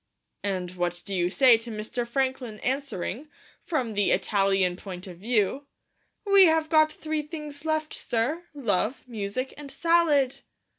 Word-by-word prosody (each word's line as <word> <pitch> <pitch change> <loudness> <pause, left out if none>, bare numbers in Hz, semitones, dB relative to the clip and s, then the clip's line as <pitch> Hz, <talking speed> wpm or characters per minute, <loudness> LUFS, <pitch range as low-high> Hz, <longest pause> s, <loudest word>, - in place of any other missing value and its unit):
And 185 -3 -2
what 175 0 -2
do 200 - -4
you 175 -2 +1
say 240 +2 +6
to 230 +1 -8
Mr. 225 +2 -4
Franklin 260 -3 -2
answering, 265 - -3 0.3
from 260 -9 -1
the 205 -1 +2
Italian 195 -3 +2
point 185 -1 -8
of 180 -3 -10
view, 235 +5 0 0.6
"We 395 -1 +7
have 320 -1 +2
got 310 -1 +5
three 310 0 -3
things 300 -1 -8
left, 310 -1 -1
sir 285 +10 -2
Love, 230 -2 0
Music, 235 +2 -4
and 290 -1 -9
Salad"'? 300 -4 +3
250 Hz, 145 wpm, -26 LUFS, 200-300 Hz, 0.6 s, We